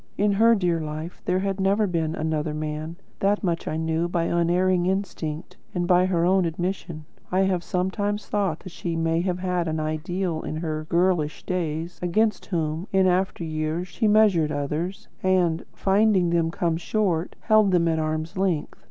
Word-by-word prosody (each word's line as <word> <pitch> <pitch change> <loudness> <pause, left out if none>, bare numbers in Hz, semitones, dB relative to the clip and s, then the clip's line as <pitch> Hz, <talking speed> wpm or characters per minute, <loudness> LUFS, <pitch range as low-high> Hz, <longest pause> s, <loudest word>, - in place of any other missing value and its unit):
In 205 +1 +3
her 225 +3 +5
dear 175 -5 +1
life, 155 +2 -6
there 180 - +1
had 195 0 -1
never 200 +3 +2
been 165 -4 -1
another 155 -1 -2
man; 155 +1 -4 0.2
that 205 +2 +1
much 170 -3 -1
I 155 - -1
knew 160 +1 0
by 170 -1 0
unerring 175 +2 +2
instinct 175 -4 -3 0.2
and 175 -1 0
by 180 0 +4
her 170 -2 +1
own 190 +1 +4
admission. 170 -1 -3 0.3
I 185 +1 +3
have 190 -2 +1
sometimes 205 +4 -1
thought 195 -6 -1
that 185 - -9
she 170 0 -4
may 165 0 +1
have 180 -1 -1
had 180 -2 -1
an 160 0 -1
ideal 160 +2 -2
in - - -5
her 155 -1 -3
girlish 170 -3 +1
days, 170 -1 -3
against 210 +5 +1
whom, 165 0 -2
in 190 -1 +4
after 185 -1 +1
years, 155 +2 -2
she 220 +4 0
measured 205 -8 +4
others, 155 +6 -3
and, 180 -3 +2
finding 195 -3 +2
them 165 -1 +2
come 165 -1 -1
short, 180 -2 -1
held 215 -2 +4
them 175 -2 +3
at 160 -1 +1
arm's 155 +1 -2
length. 180 -6 -1
175 Hz, 175 wpm, -25 LUFS, 160-190 Hz, 0.3 s, her